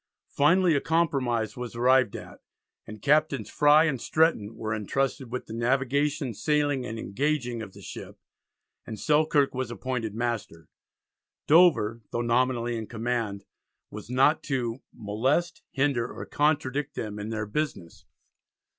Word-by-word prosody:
Finally 170 Hz, +3 st, +4 dB
a 140 Hz, -, +1 dB
compromise 135 Hz, -9 st, 0 dB
was 125 Hz, -1 st, -6 dB
arrived 130 Hz, -2 st, +3 dB
at, -, -, -10 dB, 0.5 s
and 110 Hz, -1 st, -10 dB
Captains 155 Hz, +3 st, +2 dB
Frye 150 Hz, +1 st, +5 dB
and 140 Hz, -7 st, -1 dB
Stretton 155 Hz, -10 st, +1 dB
were 110 Hz, -1 st, -3 dB
entrusted 125 Hz, +4 st, -2 dB
with 125 Hz, -, -4 dB
the -, -, -9 dB
"navigation, 135 Hz, +3 st, 0 dB
sailing, 145 Hz, +2 st, 0 dB
and 115 Hz, -, -5 dB
engaging" 125 Hz, +1 st, -2 dB
of 100 Hz, -3 st, -8 dB
the -, -, -13 dB
ship, -, -, -9 dB, 0.7 s
and 110 Hz, -2 st, -6 dB
Selkirk 150 Hz, -2 st, +2 dB
was 130 Hz, -2 st, -3 dB
appointed 120 Hz, -3 st, -4 dB
Master. 115 Hz, -9 st, -4 dB, 0.8 s
Dover, 145 Hz, -9 st, +4 dB
though 120 Hz, -, -2 dB
nominally 120 Hz, 0 st, +1 dB
in 110 Hz, -1 st, -5 dB
command, 115 Hz, -4 st, -3 dB, 0.5 s
was 105 Hz, +1 st, -9 dB
not 135 Hz, +5 st, +3 dB
to 125 Hz, -3 st, -2 dB
"molest, 130 Hz, +11 st, -1 dB
hinder, 135 Hz, -3 st, 0 dB
or -, -, -7 dB
contradict 145 Hz, -2 st, 0 dB
them 105 Hz, -1 st, -5 dB
in 105 Hz, +1 st, -5 dB
their 110 Hz, -2 st, -3 dB
business." 105 Hz, -, -4 dB
125 Hz, 135 wpm, -27 LUFS, 115-145 Hz, 0.8 s, Frye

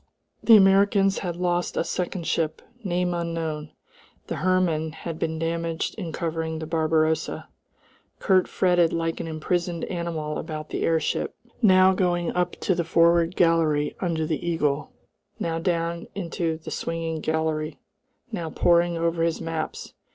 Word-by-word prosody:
The 225 Hz, -2 st, +8 dB
Americans 195 Hz, 0 st, +4 dB
had 175 Hz, -3 st, -3 dB
lost 175 Hz, 0 st, -1 dB
a -, -, +2 dB
second 180 Hz, 0 st, -3 dB
ship, 160 Hz, -1 st, -1 dB, 0.2 s
name 180 Hz, -2 st, 0 dB
unknown; 165 Hz, -3 st, -3 dB, 0.5 s
the -, -, -4 dB
Hermann 175 Hz, -4 st, +1 dB
had 160 Hz, 0 st, -6 dB
been 160 Hz, 0 st, -1 dB
damaged 165 Hz, 0 st, -2 dB
in 180 Hz, -7 st, -5 dB
covering 160 Hz, -1 st, -3 dB
the 160 Hz, -, -5 dB
Barbarossa.... 160 Hz, 0 st, 0 dB, 0.7 s
Kurt 185 Hz, -2 st, +3 dB
fretted 175 Hz, -3 st, +2 dB
like 165 Hz, 0 st, -1 dB
an -, -, -4 dB
imprisoned 170 Hz, +2 st, -2 dB
animal 165 Hz, -4 st, -3 dB
about 155 Hz, -1 st, -6 dB
the -, -, -3 dB
airship, 160 Hz, -2 st, 0 dB, 0.3 s
now 190 Hz, -3 st, +6 dB
going 175 Hz, -2 st, 0 dB
up 180 Hz, 0 st, 0 dB
to 190 Hz, -, +2 dB
the 170 Hz, -1 st, 0 dB
forward 170 Hz, +1 st, +3 dB
gallery 160 Hz, -4 st, +2 dB
under 165 Hz, -4 st, -1 dB
the 155 Hz, -2 st, -2 dB
eagle, 150 Hz, -4 st, 0 dB, 0.5 s
now 165 Hz, -1 st, -1 dB
down 170 Hz, -1 st, -1 dB
into 170 Hz, -3 st, -2 dB
the 160 Hz, -, -9 dB
swinging 165 Hz, -1 st, -3 dB
gallery, 155 Hz, -1 st, -1 dB, 0.5 s
now 170 Hz, -7 st, -3 dB
poring 170 Hz, +1 st, +3 dB
over 165 Hz, 0 st, 0 dB
his 165 Hz, -1 st, +1 dB
maps. 165 Hz, -2 st, -4 dB
165 Hz, 145 wpm, -25 LUFS, 160-175 Hz, 0.7 s, The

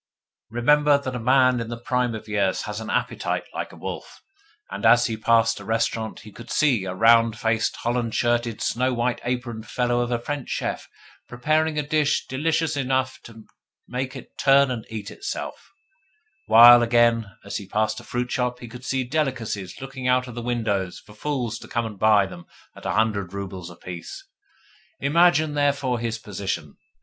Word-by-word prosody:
Remember 145 Hz, +5 st, +4 dB
that 130 Hz, -2 st, -5 dB
a -, -, -3 dB
man 130 Hz, +1 st, +4 dB
in 115 Hz, -1 st, -4 dB
the 120 Hz, -, -5 dB
prime 125 Hz, -1 st, -1 dB
of 110 Hz, 0 st, -8 dB
years 100 Hz, -3 st, 0 dB
has 105 Hz, +1 st, -5 dB
an 110 Hz, -, -7 dB
appetite -, -, -1 dB
like -, -, -4 dB
a -, -, -13 dB
wolf; -, -, -8 dB, 0.5 s
and -, -, -6 dB
as 120 Hz, +1 st, +6 dB
he 115 Hz, -, -1 dB
passed 115 Hz, +1 st, +2 dB
a -, -, -9 dB
restaurant 110 Hz, 0 st, -2 dB
he 105 Hz, -, -12 dB
could 115 Hz, -, -12 dB
see 125 Hz, -10 st, +2 dB
a 90 Hz, -1 st, -4 dB
round 115 Hz, +2 st, +5 dB
faced, 110 Hz, 0 st, 0 dB
holland 120 Hz, -1 st, -2 dB
shirted, 120 Hz, -2 st, 0 dB
snow 125 Hz, +1 st, 0 dB
white 120 Hz, +1 st, -1 dB
aproned 120 Hz, -3 st, -4 dB
fellow 120 Hz, 0 st, 0 dB
of 120 Hz, 0 st, 0 dB
a 120 Hz, -, +1 dB
French 140 Hz, +3 st, -5 dB
chef -, -, -3 dB, 0.4 s
preparing 155 Hz, +5 st, 0 dB
a 150 Hz, -, +1 dB
dish 150 Hz, 0 st, +1 dB
delicious 160 Hz, +3 st, 0 dB
enough 130 Hz, -1 st, -1 dB
to 115 Hz, -2 st, -13 dB, 0.4 s
make 130 Hz, +2 st, -4 dB
it 130 Hz, -, -11 dB
turn 140 Hz, 0 st, +5 dB
to -, -, 0 dB
and 115 Hz, -3 st, -7 dB
eat 110 Hz, -3 st, -6 dB
itself; -, -, -6 dB, 0.8 s
while, 120 Hz, +2 st, +9 dB
again, 115 Hz, -3 st, +2 dB
as 100 Hz, 0 st, -4 dB
he 100 Hz, -, -8 dB
passed 110 Hz, +2 st, 0 dB
a -, -, -13 dB
fruit 125 Hz, 0 st, -3 dB
shop 125 Hz, -1 st, -1 dB
he 120 Hz, -, -9 dB
could 125 Hz, +2 st, -11 dB
see 130 Hz, 0 st, -1 dB
delicacies 125 Hz, -, -3 dB
looking 135 Hz, -1 st, -5 dB
out 125 Hz, 0 st, +2 dB
of 120 Hz, -, -9 dB
a 120 Hz, -, -4 dB
window 110 Hz, -6 st, -1 dB, 0.2 s
for 105 Hz, -, -15 dB
fools 120 Hz, -1 st, -3 dB
to -, -, -12 dB
come 120 Hz, -1 st, -1 dB
and 105 Hz, -3 st, -7 dB
buy 105 Hz, -1 st, +5 dB
them 85 Hz, -2 st, -11 dB, 0.3 s
at -, -, -7 dB
a -, -, 0 dB
hundred 105 Hz, -4 st, 0 dB
roubles 95 Hz, -3 st, -6 dB
apiece. 85 Hz, 0 st, -9 dB, 0.7 s
Imagine, 155 Hz, +1 st, +3 dB
therefore, 140 Hz, -4 st, +1 dB
his 115 Hz, 0 st, -2 dB
position! 95 Hz, -8 st, -5 dB
120 Hz, 185 wpm, -24 LUFS, 110-130 Hz, 0.8 s, while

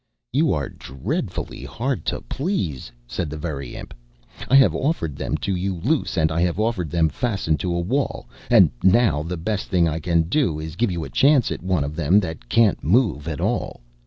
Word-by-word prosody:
"You -, -, +3 dB
are -, -, -1 dB
dreadfully 65 Hz, 0 st, -5 dB
hard 120 Hz, -, -3 dB
to -, -, -2 dB
please," 80 Hz, -, -3 dB
said 80 Hz, +6 st, -4 dB
the 75 Hz, -, -6 dB
Very 70 Hz, -5 st, -5 dB
Imp. -, -, -9 dB, 0.6 s
"I 135 Hz, -, +5 dB
have 135 Hz, -1 st, +6 dB
offered 130 Hz, -, -1 dB
them -, -, -2 dB
to 95 Hz, -, 0 dB
you 95 Hz, +1 st, -2 dB
loose, 125 Hz, -, -1 dB
and 80 Hz, -1 st, +2 dB
I 85 Hz, +1 st, 0 dB
have 90 Hz, +2 st, 0 dB
offered 110 Hz, -7 st, 0 dB
them 85 Hz, 0 st, +2 dB
fastened 95 Hz, -, -1 dB
to 90 Hz, -2 st, -1 dB
a -, -, 0 dB
wall, 125 Hz, +11 st, -2 dB, 0.2 s
and -, -, +6 dB
now 95 Hz, -5 st, +4 dB
the 85 Hz, +3 st, -4 dB
best 95 Hz, +4 st, -2 dB
thing 90 Hz, -3 st, +2 dB
I 80 Hz, 0 st, -2 dB
can 85 Hz, 0 st, +2 dB
do 85 Hz, -, 0 dB
is 80 Hz, +1 st, -5 dB
to 85 Hz, -, -13 dB
give 120 Hz, -4 st, +2 dB
you 85 Hz, -2 st, -3 dB
a -, -, -7 dB
chance 140 Hz, -2 st, +4 dB
at -, -, -4 dB
one 90 Hz, -5 st, 0 dB
of 75 Hz, +2 st, -5 dB
them 85 Hz, +5 st, +4 dB
that 80 Hz, -9 st, -7 dB
can't 110 Hz, -, +3 dB
move 85 Hz, -, +2 dB
at 75 Hz, -4 st, -3 dB
all. -, -, -2 dB
85 Hz, 210 wpm, -22 LUFS, 80-110 Hz, 0.6 s, have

